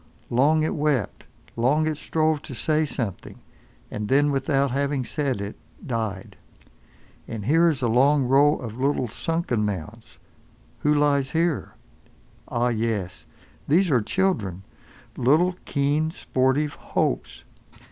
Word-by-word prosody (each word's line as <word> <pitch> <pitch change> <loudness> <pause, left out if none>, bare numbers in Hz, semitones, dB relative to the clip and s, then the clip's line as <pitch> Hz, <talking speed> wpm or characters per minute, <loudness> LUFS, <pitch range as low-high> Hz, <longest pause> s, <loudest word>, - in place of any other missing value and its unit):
Long 150 +6 +3
it 155 - 0
wept, 145 -8 -1 0.3
long 135 +7 +2
it 155 -1 0
strove 155 0 0
to 130 - -8
say 155 +6 +1
something, 115 -9 -5 0.5
and 105 0 -4
then 145 +4 +3
without 135 0 +1
having 140 -1 -1
said 140 -6 -2
it—died. 100 0 -6 0.9
And 110 -3 -6
here 165 +5 +4
is 140 -5 -2
a - - +3
long 135 +5 +4
row 140 +4 +4
of 115 -1 -7
little 135 -1 +1
sunken 145 -2 -2
mounds. 105 +3 -5 0.6
Who 150 - +1
lies 140 -2 +2
here? 165 -1 -1 0.7
Ah! 120 +1 0
yes. 110 -6 -2 0.4
These 175 +3 +3
are 125 -4 +4
children. 105 - -1 0.5
Little, 160 +9 +3
keen, 145 +2 0
sportive 140 -1 0
Hopes. - - -2
135 Hz, 125 wpm, -24 LUFS, 115-150 Hz, 0.9 s, here